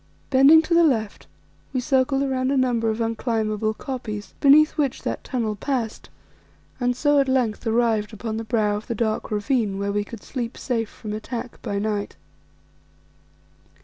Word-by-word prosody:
Bending 280 +5 +7
to 335 - -1
the 340 0 +6
left, 225 -9 0 0.5
we 255 - +1
circled 270 +2 +1
round 260 0 0
a 280 - +1
number 240 -3 +1
of 220 +1 -2
unclimbable 220 -2 -1
koppies, 225 -6 -6
beneath 300 +2 +6
which 280 -4 -1
that - - -3
tunnel 225 -5 -2
passed, 235 -1 -3 0.7
and 245 -1 +1
so 290 +2 +3
at 275 - +2
length 245 -4 0
arrived 225 -2 +1
upon 220 +1 -5
the 225 - -3
brow 215 -3 +1
of 210 - -9
the 235 - -2
dark 220 -1 -1
ravine 210 -1 0
where 200 0 -1
we 205 0 0
could 215 0 -10
sleep 245 -2 -5
safe 225 -4 -2
from 210 -2 -7
attack 230 +3 -6
by 200 - -3
night. 205 0 -2
230 Hz, 165 wpm, -23 LUFS, 215-260 Hz, 0.7 s, Bending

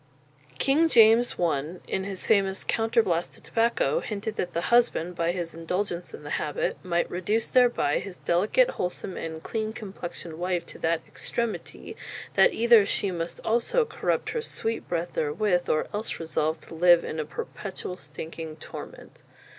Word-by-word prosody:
King 305 +5 +3
James 230 -1 +6
I 160 -1 0
in 190 - -2
his 195 -2 -5
famous 195 -3 +2
"Counter 225 +1 +2
blaste 170 -3 -1
to - - -16
Tobacco," 235 - +1
hinted 215 - -4
that 175 - -3
the 170 - -1
husband, 180 -7 +3
by 170 0 +1
his 175 -2 -4
indulgence 175 +2 -3
in 445 - -10
the - - -7
habit, - - -2
might 175 -2 +1
"reduce 205 +6 -1
thereby 245 - +3
his 195 -2 -7
delicate, 205 - +3
wholesome, 180 +1 -4
and 160 -1 -5
cleane 220 -1 -2
complexioned 175 -6 -7
wife 180 -1 -1
to - - -11
that 165 0 +1
extremitie, 235 -2 -4 0.4
that - - +6
either 235 -2 +6
shee 200 0 0
must 170 -1 -4
also 240 - +2
corrupt 450 - -1
her 470 - -1
sweete 230 - -3
breath 170 0 -2
therewith, 175 +4 +1
or 155 - +2
else 210 +2 -3
resolve 160 -1 -1
to - - -12
live 175 +1 +6
in 155 - -4
a - - 0
perpetuall 185 +3 -6
stinking 160 0 -7
torment." 155 - -10
185 Hz, 160 wpm, -27 LUFS, 170-225 Hz, 0.4 s, James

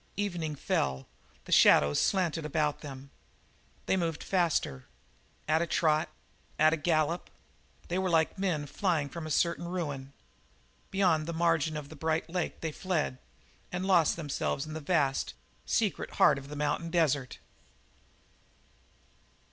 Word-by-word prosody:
Evening 175 -7 -2
fell; 65 - -1 0.4
the - - -9
shadows 70 0 +6
slanted 170 -5 +1
about 150 0 -1
them. 140 -2 -9 0.7
They - - +2
moved 165 -4 -2
faster 165 - 0 0.6
at 160 +1 +3
a 170 - 0
trot 155 -1 +2 0.5
at 155 +1 +5
a - - +1
gallop. 160 +1 0 0.6
They 180 +2 -1
were 190 0 0
like 160 -2 +2
men 170 -7 0
flying 155 -1 0
from 165 0 -6
a - - -6
certain 170 +3 +1
ruin. 145 -7 -4 0.8
Beyond 175 -5 +2
the 170 - -3
margin 160 -2 +1
of 145 -2 -7
the 155 - -10
bright 160 +2 -1
lake 180 -2 -3
they 160 - -2
fled 155 -7 -2 0.5
and 180 +1 -3
lost 175 -5 +4
themselves 145 -2 -2
in 155 - -7
the 160 - -4
vast, 145 -4 0 0.3
secret - - 0
heart 140 - +4
of 135 - -12
the 150 - -7
mountain 150 +3 -1
desert. 150 -6 +1
160 Hz, 140 wpm, -30 LUFS, 145-170 Hz, 0.8 s, shadows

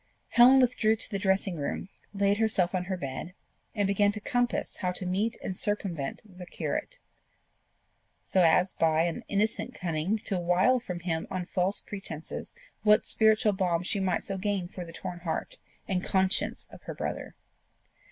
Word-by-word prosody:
Helen 255 +3 +7
withdrew 240 -3 +3
to 225 - -7
the 200 - -1
dressing 190 -2 +1
room, 145 +4 -3 0.2
laid 200 +1 +1
herself 200 -5 +2
on 180 -1 -1
her 185 0 -2
bed, 150 +4 -6 0.4
and 205 -2 +1
began 205 +1 +3
to 210 - -4
compass 245 +3 -1
how 180 -2 -1
to 185 - -6
meet 200 +6 0
and 185 - -3
circumvent 180 -9 -2
the 180 -3 -11
curate, - - -3 1.3
so 190 - +2
as 175 +2 +4
by 160 0 +3
an 170 -1 -2
innocent 215 +4 0
cunning 170 +3 -1
to 190 - 0
wile 180 +9 +3
from 180 -7 -6
him 165 -2 -2
on 185 -1 -3
false 185 +2 0
pretences 175 - -7 0.3
what 210 -1 +5
spiritual 220 -1 +4
balm 180 -3 0
she 200 - -1
might 185 -2 0
so 195 -1 -4
gain 200 -2 -1
for 180 0 -7
the 165 - -10
torn 175 +1 -6
heart 170 -2 -4 0.3
and 185 -1 0
conscience 190 0 0
of - - -12
her - - -6
brother. - - -4
190 Hz, 170 wpm, -29 LUFS, 175-210 Hz, 1.3 s, Helen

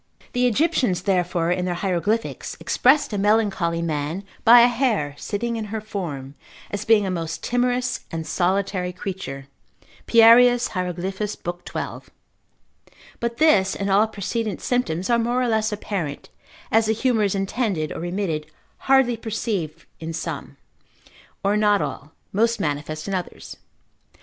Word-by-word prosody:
The 250 -1 +3
Egyptians 245 - +1
therefore 180 -3 +1
in 180 0 0
their 180 -1 -1
hieroglyphics 195 +5 -2
expressed 265 -2 +3
a 205 - -1
melancholy 195 -5 +1
man 155 +3 -2 0.2
by 235 +1 +9
a 240 - +7
hare 235 - 0
sitting 230 +8 -3
in 220 - -3
her 220 +1 -4
form, 165 -11 -6 0.4
as 205 - -4
being 220 -2 +4
a 190 - -1
most 165 -2 -4
timorous 245 +1 0
and 165 -1 -5
solitary 185 0 0
creature, 180 -8 -6 0.6
Pierius 240 +1 +6
Hieroglyph. 185 +1 -3 0.2
l. 175 0 -4
12. - - -6 1.1
But 235 0 -3
this, 205 -12 +4
and 200 0 -2
all 205 +3 +4
precedent 215 -1 -3
symptoms, 190 -8 -1
are 235 - +4
more 240 +2 0
or 250 - +1
less 220 -1 +1
apparent, 190 -8 -4 0.4
as 225 0 +3
the 220 - +3
humour 230 0 +1
is 200 - 0
intended 195 -5 -1
or - - -5
remitted, 175 -3 -2 0.4
hardly 265 -3 +5
perceived 200 -8 -3
in 165 +1 -5
some, 160 - -5 0.9
or 200 +1 +2
not 210 -1 +3
all, 150 -3 -5 0.2
most 230 +3 +2
manifest 155 -2 -3
in 195 - -3
others. 180 -2 -5
200 Hz, 145 wpm, -23 LUFS, 175-230 Hz, 1.1 s, by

